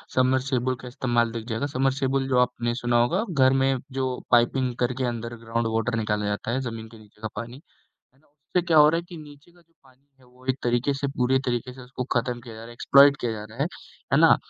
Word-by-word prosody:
Submersible 130 0 +1
का 125 - -9
इस्तेमाल 120 -2 0
दिख 115 -1 -6
जाएगा। 115 +5 -1
समर्सिबल 135 0 0
जो 130 -2 +1
आपने 120 -1 0
सुना 120 -1 +1
होगा, 175 - +1
घर 130 -3 +4
में 135 0 +2
जो 130 -1 -2
पाइपिंग 120 +1 +3
करके 125 +1 -1
अंडर 120 -1 -4
ग्राउंड 115 0 -1
वॉटर 115 +1 0
निकाला 105 -1 -1
जाता 105 +2 -2
है 130 - 0
ज़मीन 115 -3 -6
के 115 0 -15
नीचे 105 0 -20
का 110 - -2
पानी। 115 +3 -6 0.4
है 130 - -38
ना? - - -31
उससे 150 +5 -3
क्या 165 -2 +3
हो 150 0 +8
रहा 165 - +2
है - - -4
कि 175 - -9
नीचे 150 +1 -13
का 175 - -23
जो 165 0 -32
पानी 130 +1 -25
है 130 - -23
वो 125 +1 -21
एक 130 - -1
तरीके 120 +3 +1
से 140 +1 -2
पूरे 130 +1 +2
तरीके 125 0 -2
से 130 - -13
उसको 125 0 -6
खत्म 120 0 -3
किया 115 -2 -11
जा 110 - -10
रहा 115 - -9
है, 120 - -11
एक्सप्लॉइट 140 +3 +6
किया 120 -2 -1
जा 105 -1 -6
रहा 115 - -13
है, 150 - +1 0.5
है - - +5
ना? - - +7
125 Hz, 245 wpm, -25 LUFS, 120-135 Hz, 0.5 s, हो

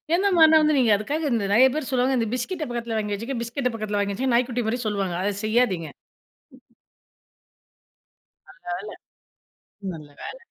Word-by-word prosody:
எந்த 385 +3 +2
மாரினா 315 -1 +7
வந்து 305 -1 +3
நீங்க 240 -4 +3
அதுக்காக 290 +9 -2
இந்த 225 -3 0
நெறைய 255 +5 +7
பேர் 305 -4 -3
சொல்லுவாங்க 260 +1 +2
"இந்த 225 -2 -1
பிஸ்கட்ட 310 +6 -3
பக்கத்தில 235 -2 -3
வாங்கி 210 -1 -3
வச்சுக்கங்க 235 +3 -4
பிஸ்கட்ட 250 +2 -2
பக்கத்தில 210 -2 -2
வாங்கி 200 0 -1
வச்சுக்கங்க" 250 +4 0
நாய்க்குட்டி 245 0 0
மாரி 245 +3 -1
சொல்லுவாங்க, 195 -4 -1
அதை 205 +1 0
செய்யாதீங்க. 215 -9 +1 2.6
நல்ல - - -16
வேல 185 +4 -5 1.0
நல்ல 155 -3 -10
வேல. - - -7
235 Hz, 155 wpm, -24 LUFS, 205-265 Hz, 2.6 s, மாரினா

